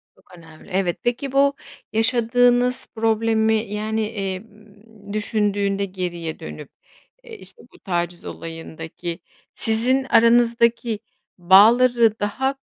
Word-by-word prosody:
Çok 180 - -19
önemli. 160 -2 -16
Evet, 185 -2 0
peki, 255 +3 -2
bu 280 +1 +3 0.4
yaşadığınız 245 +2 +2
problemi, 220 0 +1 0.2
yani, 220 +1 -2
emm, 205 +1 -8
düşündüğünde 205 -2 -1
geriye 175 -4 -5
dönüp, 150 -3 -9 0.5
eee, 455 -3 -11
işte 465 - -16
bu - - -18
taciz 175 -2 -3
olayındaki 165 +1 -7 0.3
sizin 245 +4 +1
aranızdaki 235 -2 +3 0.4
bağları 225 +5 +5
daha 265 +7 -1
220 Hz, 100 wpm, -21 LUFS, 190-235 Hz, 0.5 s, bağları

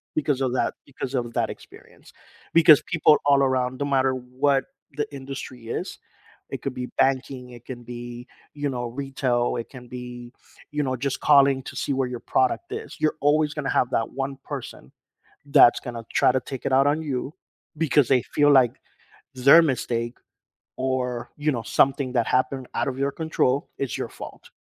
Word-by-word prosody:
because 145 -3 0
of 130 -1 0
that - - 0
because 135 -1 -6
of 120 -2 -2
that - - 0
experience, - - -15 0.4
because 160 -3 +7
people 160 -3 +4
all 140 -1 +5
around, 130 -1 0
no 140 - -1
matter 135 -1 +2
what 130 +2 0 0.3
the 150 -1 -1
industry 135 -3 -8
is, - - -4 0.5
it - - -6
could 135 - -3
be 125 0 -4
banking, 130 -1 0
it 120 -1 -13
can 120 -2 -8
be, 120 +1 -8 0.3
you 145 -1 -2
know, 120 -2 -3
retail, 125 -2 -1
it 115 - -7
can 125 -2 -12
be, 125 0 -8 0.4
you 150 0 -1
know, 130 -1 -1
just 135 +2 -2
calling 140 -2 +5
to - - -9
see 140 - -1
where 130 -1 0
your 125 -1 -5
product 130 - 0
is, 440 +1 -6
you're 155 0 +1
always 150 +1 +2
gonna 150 -3 -3
have 125 - +2
that 115 - 0
1 135 0 -4
person - - -8 0.6
that's 135 -5 +7
gonna 120 -1 -7
try - - +4
to 130 - +1
take 135 -2 -8
it 130 - 0
out 135 +2 +5
on 155 +2 +1
you 140 0 -3 0.4
because 145 -4 +3
they 130 -3 +4
feel 145 0 +3
like 130 -4 +5 0.6
their 140 +6 +7
mistake 120 -4 -1 0.6
or, 130 -2 -2
you 150 +1 0
know, 115 -3 -3
something 135 +5 +1
that 120 -3 +1
happened 130 0 0
out - - 0
of 130 - -3
your 140 +1 +1
control, 145 -4 0
is 135 -4 -2
your - - -3
fault. - - -11
130 Hz, 185 wpm, -24 LUFS, 125-140 Hz, 0.6 s, because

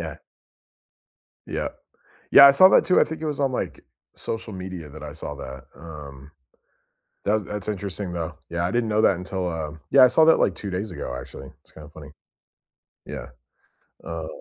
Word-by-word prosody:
Yeah. 80 -2 -6 1.3
Yeah. - - -3 0.6
Yeah, 140 - +10
I - - +10
saw 185 +7 +8
that - - +5
too, 185 - +4
I - - +6
think 160 0 -7
it - - -2
was 150 -2 -3
on, 135 -2 +1
like, - - -4 0.3
social 110 -1 -5
media 90 -4 -7
that 75 +1 -11
I 75 -1 -7
saw 75 -1 -7
that, 65 -2 -9
um 70 -3 -11 1.0
Tha 110 +2 +2
that's 105 0 -6
interesting, 100 -2 -4
though. 85 -1 -4
Yeah, 85 0 -1
I 90 - -1
didn't 120 0 0
know 105 0 +2
that 95 - +4
until, 90 0 -4
uh 80 -3 -4 0.2
Yeah, 135 -1 +8
I - - +9
saw 145 +6 +4
that, 165 - +6
like, - - +2
2 100 - -5
days 95 +2 -4
ago, 60 -7 -5
actually, - - -10
it's - - -18
kinda 75 -2 -13
funny. 75 -3 -11 0.9
Yeah, - - -7 0.7
uh 80 -1 -5
90 Hz, 185 wpm, -24 LUFS, 80-110 Hz, 1.3 s, Yeah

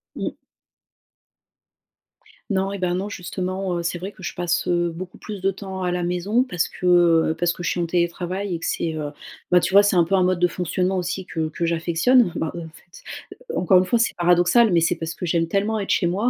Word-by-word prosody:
Mmh. - - -3 2.2
Non 195 0 0
et, 200 - -5
ben, 180 -1 0
non 195 +3 -2
justement, 185 -1 -3
heu, 170 - -3
c'est 170 +1 -2
vrai 190 +4 -6
que 190 - -16
je 175 - -4
passe, 175 0 -1
heu, 175 -1 +1
beaucoup 180 +2 -8
plus 205 -3 -8
de 195 +1 +2
temps 190 -1 -7
à 180 - 0
la 180 0 -1
maison 185 +8 +1
parce 180 -9 -1
que, 180 - -8 0.5
heu, - - -3
parce 175 -1 +1
que 175 - -8
je - - 0
suis 180 - -2
en 170 - +1
télétravail 180 +3 -2
et - - -5
que - - -6
c'est, 165 -1 -1
heu, 150 -1 -4 0.4
ben, 180 - +6
tu 190 - -2
vois 200 +1 +8
c'est 200 -2 +2
un 175 - +5
peu 195 +4 0
un 185 - +3
mode 180 -1 +1
de 180 - +4
fonctionnement 180 +2 -1
aussi 180 +1 -3
que 160 -3 -3
que 165 +2 -3
j'affectionne. 170 +7 +2
Bah, 160 - -2
heu, - - -5
en 160 - -8
fait 170 +2 -17 0.5
encore 185 +1 +4
une 185 - +1
fois 230 +5 +1
c'est 230 - +1
paradoxal 175 +6 +4
mais 170 - +4
c'est 170 - +2
parce 165 0 -5
que 180 - -5
j'aime 165 0 +1
tellement 205 +5 0
être 200 - -5
chez 175 - +2
moi. 200 +8 +1
180 Hz, 240 wpm, -22 LUFS, 170-195 Hz, 2.2 s, vois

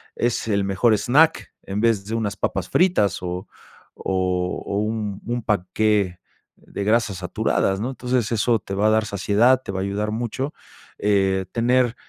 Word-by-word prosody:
es 120 -1 -1
el 100 -2 +1
mejor 100 +4 +2
snack, 150 +9 +3
en 100 +1 -4
vez 110 -4 +2
de 110 - -5
unas 110 -3 -2
papas - - -2
fritas 170 - +2
o 90 +1 -4 0.5
o 90 -1 -1
o 100 - -1
un 105 -2 -3
un 120 0 -2
panqué 100 -1 0 0.4
de 100 - -6
grasas 105 -2 +1
saturadas, 95 +1 0
¿no? 120 - -2
Entonces 125 -3 -1
eso 115 +1 +2
te 95 - -6
va 105 +2 +2
a - - +5
dar 110 0 +2
saciedad, 105 +6 +3
te - - -5
va 95 - -3
a - - -1
ayudar 105 +2 -2
mucho. 120 +5 -3 0.5
Eh, 95 -2 +2
tener 120 +1 +2
105 Hz, 170 wpm, -22 LUFS, 95-120 Hz, 0.5 s, a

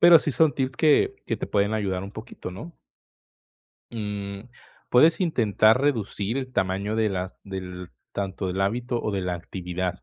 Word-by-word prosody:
Pero 170 -1 +9
sí 150 - -1
son 160 +2 +3
tips 130 -1 -1
que 395 - +4
que - - -1
te - - -4
pueden 100 +1 +1
ayudar 95 -3 -1
un 100 - -9
poquito, 110 -4 -8
¿no? 155 - -9 1.1
Mm, 100 -3 -4 0.5
puedes 155 +9 +5
intentar 115 - +3
reducir 115 -4 0
el 130 -1 -4
tamaño 95 +2 0
de 110 -1 +2
las 95 -1 -4
del 90 -2 -7 0.2
tanto 95 -1 -3
del 95 +2 -2
hábito 120 +4 0
o 105 - -2
de 95 - -1
la 90 -1 -1
actividad, 90 +1 -4
105 Hz, 170 wpm, -25 LUFS, 95-130 Hz, 1.1 s, Pero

